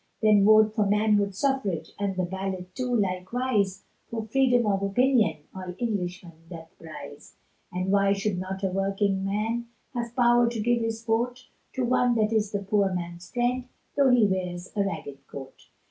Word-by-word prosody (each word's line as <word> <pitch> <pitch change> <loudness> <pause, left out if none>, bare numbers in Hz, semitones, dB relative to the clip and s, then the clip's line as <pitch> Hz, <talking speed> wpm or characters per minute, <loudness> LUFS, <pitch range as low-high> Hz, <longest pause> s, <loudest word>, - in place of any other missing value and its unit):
Then 210 -2 +6
vote 215 0 +6
for 210 -2 +1
manhood 205 -1 +2
suffrage, 265 - -1
And 200 -1 -1
the 185 - 0
ballot 190 0 -5
too, 250 -1 -1
likewise, 200 +1 0 0.3
For 225 -1 -4
Freedom 245 +1 +3
of 195 -2 +1
opinion, 215 - +2
All 185 -1 -7
Englishmen 180 -7 -4
doth 165 0 -10
prize; 145 -3 -11 0.4
And 185 +1 -2
why 200 0 +4
should 195 -2 -1
not 190 +1 -5
a 190 - +2
working 195 0 0
man 220 +4 -1 0.3
Have 240 -1 -4
power 240 -1 +4
to 235 -1 -4
give 240 +2 +1
his 225 0 -3
vote, 245 +2 -1 0.3
To 260 -2 -1
one 245 0 +2
that 220 0 +1
is 215 -2 +1
the 200 -1 -2
poor 195 -1 +2
man's 175 -1 -5
friend, 245 +1 0 0.3
Tho' 280 -2 +4
he 245 -3 +5
wears 180 -2 -2
a 200 - +2
ragged 145 -7 -6
coat. 135 -1 -10
205 Hz, 170 wpm, -26 LUFS, 185-235 Hz, 0.4 s, Then